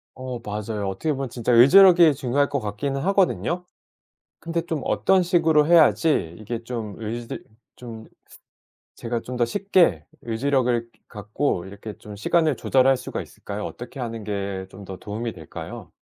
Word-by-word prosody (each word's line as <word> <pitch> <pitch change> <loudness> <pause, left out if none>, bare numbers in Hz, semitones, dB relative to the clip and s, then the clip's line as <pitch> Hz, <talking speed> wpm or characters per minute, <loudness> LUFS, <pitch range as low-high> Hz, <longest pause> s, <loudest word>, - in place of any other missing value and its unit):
어 130 -1 -6
맞아요. 105 -1 -4
어떻게 95 +12 -2
보면 135 -2 -3
진짜 120 0 -2
의지력이 170 +6 +7
중요할 140 +1 0
것 140 - -1
같기는 135 +6 -3
하거든요. 180 -1 +1 0.7
근데 170 0 -2
좀 160 -5 -3
어떤 190 -1 +2
식으로 165 -4 +3
해야지 155 - +3
이게 115 +2 -5
좀 115 -5 -5
의지 115 +1 -6 0.3
좀 115 -2 -10 0.9
제가 115 0 -3
좀 125 - -7
더 120 - +2
쉽게 175 - +2 0.2
의지력을 120 0 0 0.2
갖고 105 -1 -2
이렇게 100 +2 -9
좀 105 -1 -10
시간을 155 +8 +1
조절할 135 0 +3
수가 - - -5
있을까요? 105 +1 -8
어떻게 125 +3 -8
하는 115 -2 -5
게 100 -2 -4
좀 100 +1 -11
더 95 0 -8
도움이 110 +4 -5
될까요? 80 -3 -9
120 Hz, 320 characters per minute, -23 LUFS, 105-150 Hz, 0.9 s, 의지력이